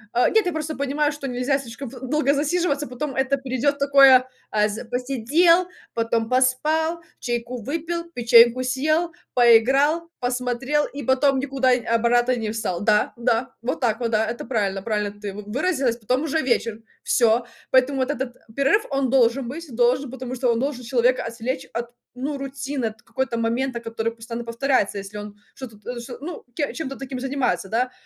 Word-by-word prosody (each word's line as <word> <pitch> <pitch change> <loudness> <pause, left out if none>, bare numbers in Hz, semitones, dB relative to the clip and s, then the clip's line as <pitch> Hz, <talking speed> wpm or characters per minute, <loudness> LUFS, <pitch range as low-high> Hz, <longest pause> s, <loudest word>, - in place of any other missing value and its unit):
Э, 245 - +4
нет, 440 -2 +3
я - - +1
просто 310 0 -3
понимаю, 285 +2 0
что 290 -2 -6
нельзя 250 +2 0
слишком 260 +1 -8
долго 270 +3 0
засиживаться, 295 0 0
потом 270 +3 -4
это 265 +1 +1
придет 270 +1 -1
такое 275 -2 +6 0.2
э, 210 -1 +3
з 220 +4 -6
посидел, 275 +9 +2 0.3
потом 230 -1 0
поспал, 305 +6 +1 0.2
чайку 240 0 -3
выпил, 330 +6 -3
печеньку 235 +1 +6
съел, 310 +7 0 0.2
поиграл, 270 +8 +4
посмотрел 250 +4 0
и 285 0 -8
потом 265 +2 +3
никуда 265 -1 +1
и 245 -1 0
обратно 240 +2 +2
не 220 -2 -3
встал. 215 -6 -3
Да 210 0 +2
да. 240 +2 0
Вот 240 +2 -2
так 225 -2 +1
вот, 235 -2 -1
да. 220 0 +2
Это 235 +1 -4
правильно 200 -6 -1
правильно 210 -2 -1
ты 205 -2 -5
выразилась, 240 - -1
потом 250 +5 -1
уже 320 0 0
вечер. 230 -4 0 0.2
Всё. 235 0 +3 0.3
Поэтому 260 +2 +3
вот 260 +1 0
этот 260 -3 -4 0.2
перерыв 280 +11 +3
он 275 -1 +1
должен 250 0 +3
быть, 320 +7 -7
должен, 250 +3 +2
потому 255 -1 -6
что 245 -1 +1
он 230 - -1
должен 265 -1 -2
человека 245 +1 +2
отвлечь 240 +4 -4
от, 235 0 -3 0.3
ну, 280 +3 -3
рутины 275 -1 -4
от 220 0 -9
какой-то 245 +1 -3
момента 235 +2 -1
который 230 -1 -3
постоянно 230 +1 -7
повторяется, 230 -3 0
если 200 +1 -8
он 205 0 -8 0.2
что-то 240 -5 -9
т 245 +3 -6
что, 240 0 -8
ну, 325 +2 -7
ке 290 -3 0
ну, - - -8
чем-то 275 -4 -5
таким 270 -1 -6
занимается, 265 -6 -1
да. 250 +4 0
255 Hz, 175 wpm, -23 LUFS, 235-275 Hz, 0.3 s, такое